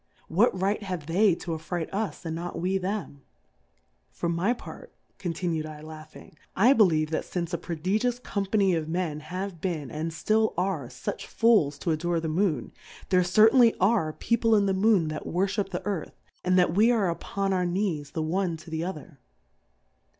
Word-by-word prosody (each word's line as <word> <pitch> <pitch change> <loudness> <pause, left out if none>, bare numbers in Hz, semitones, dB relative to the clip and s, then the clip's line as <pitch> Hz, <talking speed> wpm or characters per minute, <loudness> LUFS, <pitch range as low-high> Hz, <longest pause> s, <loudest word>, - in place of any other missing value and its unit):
What 190 +2 +3
right 200 +3 0
have 180 -6 -5
they 185 +3 +3
to 170 - -6
afright 160 +1 -3
us 200 -2 -3
and 160 -1 -3
not 175 +1 -5
we 190 +2 0
them? 190 -7 -4 0.9
For 170 - -4
my 170 +6 +1
part, 245 - -8 0.2
contimi^dllangbing^ 155 -3 -5 0.2
I 235 +8 +6
believe 165 - +3
that 160 - -1
fiiice 175 -1 -4
a 170 - -1
prodigious 200 +9 -1
Company 200 -4 0
of 160 -2 -2
Men 165 -3 -2
have 185 +1 -6
been, 155 -7 -3
and 155 +2 -3
tlill 215 +7 +1
are, 180 -8 -1
fuch 130 +1 -6
Fools 210 -12 +3
to 170 - -2
a 155 - +1
dore 170 +1 0
the 160 - -3
Moon, 155 - 0 0.4
there 185 -1 +4
certainly 220 +6 +5
are 190 -5 +2
Peo 230 +8 -1
ple 225 -1 +4
in 205 -1 +3
the 195 - +1
Moon 190 -4 +3
that 155 0 -5
worfliip 195 +3 0
the 180 -2 -5
Earth, 200 -6 -3 0.3
and 185 0 +2
that 175 -2 +3
we 215 +5 +5
are 225 -6 +2
upon 195 +3 -2
our 180 -1 +1
Knees 175 -6 -1
the 160 +2 -3
one 175 +1 -1
to 160 +1 -13
the 160 0 -2
odier. 165 -4 -6
180 Hz, 180 wpm, -27 LUFS, 160-200 Hz, 0.9 s, I